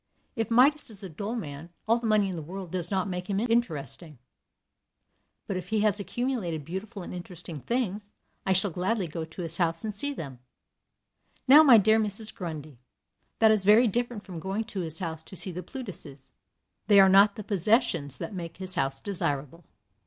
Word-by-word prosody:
If 225 Hz, -2 st, -2 dB
Midas 265 Hz, +5 st, +5 dB
is 210 Hz, -2 st, -3 dB
a 190 Hz, -, -6 dB
dull 200 Hz, +8 st, -5 dB
man, 155 Hz, -6 st, -7 dB, 0.2 s
all 230 Hz, +2 st, +3 dB
the 235 Hz, -, -3 dB
money 215 Hz, -2 st, +3 dB
in 185 Hz, -, -4 dB
the 165 Hz, -, -5 dB
world 180 Hz, +3 st, -8 dB
does 180 Hz, -2 st, -2 dB
not 190 Hz, 0 st, -1 dB
make 180 Hz, 0 st, -5 dB
him 195 Hz, 0 st, 0 dB
interesting. 180 Hz, -, -2 dB, 1.3 s
But 190 Hz, -, -3 dB
if 180 Hz, 0 st, -7 dB
he 220 Hz, -1 st, +1 dB
has 210 Hz, -1 st, +3 dB
accumulated 200 Hz, -, -3 dB
beautiful 190 Hz, +4 st, -6 dB
and -, -, -8 dB
interesting 175 Hz, -3 st, -8 dB
things, 210 Hz, -, -3 dB, 0.3 s
I 190 Hz, -, -1 dB
shall 190 Hz, +1 st, +2 dB
gladly 185 Hz, +3 st, -1 dB
go 160 Hz, +1 st, -5 dB
to 165 Hz, +3 st, -9 dB
his 165 Hz, 0 st, -2 dB
house 165 Hz, -1 st, 0 dB
and 215 Hz, -1 st, -3 dB
see 285 Hz, +9 st, -1 dB
them. 140 Hz, -, -8 dB, 1.1 s
Now, 285 Hz, +4 st, +9 dB
my 265 Hz, -7 st, +8 dB
dear 220 Hz, +2 st, +4 dB
Mrs. 215 Hz, 0 st, 0 dB
Grundy, 155 Hz, -7 st, -7 dB, 0.6 s
that 220 Hz, -1 st, +5 dB
is 215 Hz, -3 st, +3 dB
very 215 Hz, +5 st, +6 dB
different 235 Hz, 0 st, -2 dB
from 180 Hz, -3 st, -8 dB
going 195 Hz, +6 st, -3 dB
to 215 Hz, -3 st, -7 dB
his 165 Hz, -3 st, -1 dB
house 160 Hz, -4 st, -4 dB
to 175 Hz, -, -13 dB
see 185 Hz, -, +5 dB
the 180 Hz, +1 st, -6 dB
Plutuses. 170 Hz, -, -9 dB, 0.6 s
They 205 Hz, -2 st, +6 dB
are 195 Hz, -, +8 dB
not 200 Hz, +2 st, +5 dB
the 215 Hz, -, -7 dB
possessions 200 Hz, -, +1 dB
that 215 Hz, -, -6 dB
make 170 Hz, -3 st, -7 dB
his 185 Hz, 0 st, +1 dB
house 135 Hz, -6 st, -1 dB
desirable. 165 Hz, -4 st, -3 dB
190 Hz, 190 wpm, -27 LUFS, 165-220 Hz, 1.3 s, Now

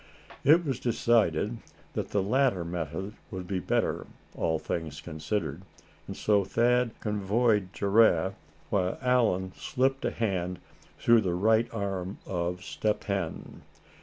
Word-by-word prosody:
It 160 Hz, +5 st, +6 dB
was 135 Hz, -4 st, -1 dB
decided 115 Hz, -3 st, +2 dB, 0.3 s
that -, -, -3 dB
the 100 Hz, -, +1 dB
latter 120 Hz, -5 st, +2 dB
method 90 Hz, +4 st, -4 dB, 0.2 s
would 95 Hz, -4 st, -6 dB
be 95 Hz, 0 st, -2 dB
better, -, -, 0 dB, 0.3 s
all 80 Hz, -1 st, 0 dB
things 80 Hz, -2 st, -4 dB
considered. 80 Hz, 0 st, -3 dB, 0.5 s
And -, -, -6 dB
so 105 Hz, -2 st, +3 dB
Thad 120 Hz, +3 st, +1 dB
convoyed 105 Hz, -1 st, +1 dB
Giraffe, 100 Hz, -3 st, +3 dB, 0.4 s
while 95 Hz, -2 st, +1 dB
Allan 115 Hz, -8 st, +2 dB
slipped 135 Hz, +1 st, 0 dB
a -, -, +1 dB
hand 90 Hz, -5 st, -2 dB, 0.4 s
through 115 Hz, -1 st, +5 dB
the 90 Hz, -4 st, -1 dB
right 110 Hz, +5 st, +3 dB
arm 95 Hz, -3 st, -3 dB
of 90 Hz, 0 st, -2 dB
Step 105 Hz, +1 st, -1 dB
Hen. 95 Hz, -5 st, -4 dB
100 Hz, 130 wpm, -28 LUFS, 90-115 Hz, 0.5 s, It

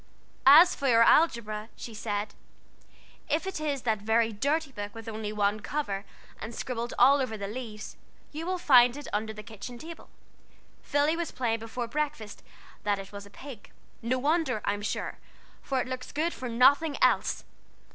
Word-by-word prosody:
"As 325 Hz, +6 st, +9 dB
for 275 Hz, -, -2 dB
your 230 Hz, -2 st, +6 dB
algebra," 230 Hz, -7 st, +2 dB
she 230 Hz, -, -8 dB
said, 210 Hz, -1 st, -3 dB, 1.0 s
"if 310 Hz, +4 st, 0 dB
it 385 Hz, -4 st, -4 dB
is 290 Hz, -4 st, -2 dB
that 220 Hz, -3 st, +1 dB
very 225 Hz, +2 st, +2 dB
dirty 285 Hz, +7 st, 0 dB
book 205 Hz, -3 st, -7 dB
with 225 Hz, 0 st, -9 dB
only 215 Hz, -1 st, -4 dB
one 210 Hz, 0 st, 0 dB
cover, 205 Hz, -3 st, -3 dB, 0.3 s
and 220 Hz, +1 st, -7 dB
scribbled 240 Hz, -1 st, -4 dB
all 280 Hz, +1 st, +6 dB
over 225 Hz, -4 st, -3 dB
the 200 Hz, -1 st, -4 dB
leaves, 215 Hz, -2 st, -7 dB, 0.3 s
you 320 Hz, +3 st, -6 dB
will 370 Hz, 0 st, 0 dB
find 250 Hz, -6 st, +5 dB
it 290 Hz, -, -8 dB
under 215 Hz, +1 st, -1 dB
the 215 Hz, -1 st, -9 dB
kitchen 225 Hz, +3 st, -9 dB
table. 325 Hz, +6 st, -10 dB, 0.7 s
Philly 290 Hz, +2 st, +1 dB
was 340 Hz, 0 st, -3 dB
playing 230 Hz, -3 st, -1 dB
before 230 Hz, +2 st, -5 dB
breakfast 285 Hz, -5 st, -4 dB, 0.4 s
that 205 Hz, -1 st, 0 dB
it 195 Hz, 0 st, -9 dB
was 200 Hz, 0 st, -9 dB
a -, -, -16 dB
pig: 245 Hz, +1 st, -11 dB, 0.3 s
no 235 Hz, +3 st, 0 dB
wonder, 285 Hz, -4 st, +1 dB
I'm 205 Hz, 0 st, -1 dB
sure, 210 Hz, -, -4 dB, 0.4 s
for 265 Hz, -1 st, -1 dB
it -, -, -5 dB
looks 255 Hz, -1 st, -6 dB
good 325 Hz, +4 st, -1 dB
for 255 Hz, -, -6 dB
nothing 280 Hz, +6 st, +4 dB
else. -, -, +2 dB
235 Hz, 175 wpm, -28 LUFS, 215-285 Hz, 1.0 s, As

